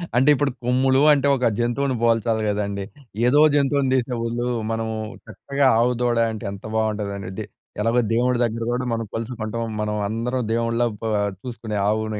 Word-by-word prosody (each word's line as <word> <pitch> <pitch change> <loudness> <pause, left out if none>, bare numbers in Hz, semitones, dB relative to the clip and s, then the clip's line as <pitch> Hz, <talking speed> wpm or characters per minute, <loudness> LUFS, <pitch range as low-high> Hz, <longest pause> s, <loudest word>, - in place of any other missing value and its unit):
అంటే 130 +4 +4
ఇప్పుడు 145 0 0
కొమ్ములూ 130 +2 +3
అంటే 140 -1 +2
ఒక 125 -2 +1
జంతువుని 125 +3 0
పోల్చాలి 115 -1 +2
కదండీ. 100 -1 -2 0.4
ఏదో 145 +4 +5
జంతువుని 140 -2 +2
తీసే 125 -1 0
బదులూ, 120 +1 -2 0.2
మనము 110 0 -2 0.3
చక్కగా 140 +7 0
ఆవు 120 +2 +3
దూడ 120 -1 +1
అంటే 110 - -6
ఎంత 100 -1 -9
బాగుంటదండీ 105 -3 -2
ఇది. - - -5 0.4
ఎలాగో 115 +3 +2
దేవుడి 125 +1 +2
దగ్గర 115 0 -1
కూడా 125 +1 -1
మనం 115 0 -2
కొలుచుకుంటాం. 115 -1 -4 0.2
మనం 105 0 -1
అందరం 120 +4 -2
దేవుడిలా 115 +1 +1 0.2
ప - - -11 0.4
చూసుకునే 115 -4 -5
ఆవుని 110 0 -1
115 Hz, 160 wpm, -22 LUFS, 110-125 Hz, 0.4 s, ఏదో